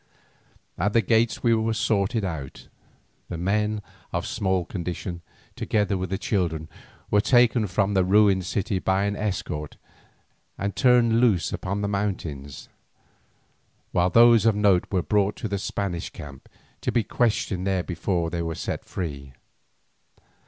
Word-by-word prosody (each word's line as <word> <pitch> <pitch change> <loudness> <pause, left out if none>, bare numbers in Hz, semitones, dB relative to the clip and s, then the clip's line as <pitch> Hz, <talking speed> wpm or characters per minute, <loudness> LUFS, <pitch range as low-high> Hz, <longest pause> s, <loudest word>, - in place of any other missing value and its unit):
At 105 - +1
the 115 - +4
gates 115 +3 +1
we 115 -2 +4
were 110 0 +1
sorted 105 0 0
out; 80 -7 -6 0.6
the 85 - -4
men 105 +4 0 0.3
of - - -2
small 95 -3 0
condition, 90 -1 -5 0.3
together 105 -2 0
with 95 -1 -3
the 95 - -1
children, 85 -7 -1 0.4
were 105 - +4
taken 120 -2 +4
from 100 +2 0
the 95 -2 +3
ruined 95 -1 +3
city 100 0 -1
by 95 +1 +1
an 100 0 -1
escort 90 -8 -4 0.8
and 100 0 -3
turned 120 -3 +4
loose 110 -9 +2
upon 100 +2 -3
the 100 - -1
mountains, 85 -9 -4 1.2
while 90 +1 +2
those 115 +1 +6
of 110 - +4
note 100 -4 +3
were 95 -3 +1
brought 105 -1 +1
to - - -4
the 100 -1 -2
Spanish 95 -3 -3
camp, 70 -2 -11 0.3
to - - -1
be 120 - +2
questioned 100 -6 0
there 95 -2 +1
before 85 -1 -2
they 85 -1 -2
were 80 -1 -3
set - - -4
free. 70 -7 -6
100 Hz, 145 wpm, -25 LUFS, 90-105 Hz, 1.2 s, those